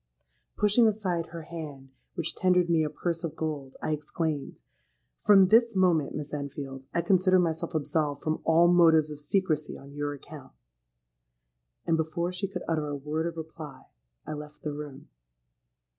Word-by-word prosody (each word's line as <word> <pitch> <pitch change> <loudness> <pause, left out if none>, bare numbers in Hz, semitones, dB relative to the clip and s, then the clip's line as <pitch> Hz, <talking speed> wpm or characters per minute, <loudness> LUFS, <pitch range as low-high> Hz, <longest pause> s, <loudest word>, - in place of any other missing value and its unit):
Pushing 210 +3 +4
aside 185 -6 -1
her 165 -1 -8
hand 150 -5 -8 0.2
which 170 -2 -2
tendered 180 -2 +3
me 160 -2 +4
a 150 - -1
purse 170 +2 -3
of 160 -2 -4
gold, 145 -5 -4
I - - 0
exclaimed, 150 0 -3 0.6
'From 195 -3 +6
this 230 +1 +5
moment, 175 -6 +2
Miss 150 0 -5
Enfield, 140 -2 -5
I 170 - 0
consider 185 +1 +4
myself 165 -1 -1
absolved 150 -1 -1
from 155 0 -1
all 165 +2 +5
motives 165 -3 +5
of 150 - -7
secrecy 155 -1 0
on 140 +1 -13
your 145 0 -3
account;'—and, - - -9
before 170 +3 -1
she 195 +2 -2
could 185 -2 -6
utter 155 -2 0
a 145 - -3
word 150 +4 -2
of 165 -1 -6
reply, 160 -3 -8 0.4
I - - -4
left 150 0 -9
the 150 - -3
room. 145 -2 -8
155 Hz, 160 wpm, -28 LUFS, 145-175 Hz, 0.6 s, From